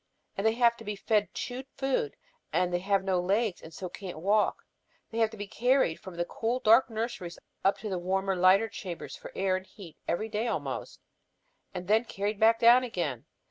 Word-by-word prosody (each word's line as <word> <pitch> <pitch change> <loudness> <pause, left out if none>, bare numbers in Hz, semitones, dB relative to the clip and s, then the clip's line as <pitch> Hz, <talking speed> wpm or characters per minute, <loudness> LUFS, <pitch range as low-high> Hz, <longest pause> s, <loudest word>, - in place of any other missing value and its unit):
And 200 +3 +1
they 220 - +3
have 235 0 +4
to 225 - -11
be 210 -1 -4
fed 210 +1 +1
chewed 255 +2 -5
food, 275 - 0 0.4
and 180 - +2
as - - -9
they 175 - +1
have 195 +1 +1
no 190 -2 +1
legs 200 +2 0
and 160 - -11
so 185 +3 -6
can't 180 -1 -8
walk, 205 +6 +1 0.5
they 230 - -3
have 225 -1 +4
to 220 - -11
be 205 - -4
carried 245 -4 +2
from 185 -2 -10
the 175 0 -1
cool 230 +7 -2
dark 230 +3 +5
nurseries 220 -6 -4 0.3
up 195 - +4
into 215 - -6
the 185 -2 -2
warmer 190 +2 0
lighter 185 +4 +5
chambers 180 -5 -7
for - - -10
air 190 -1 +1
and 185 0 -5
heat 175 -7 -13
every 195 +6 -1
day 220 +2 -2
almost, - - -4 0.7
and 180 -2 -6
then 220 +3 +3
carried 205 0 -3
back 225 +1 +5
down 240 +2 +7
again. 170 - -3
205 Hz, 210 wpm, -29 LUFS, 185-225 Hz, 0.7 s, down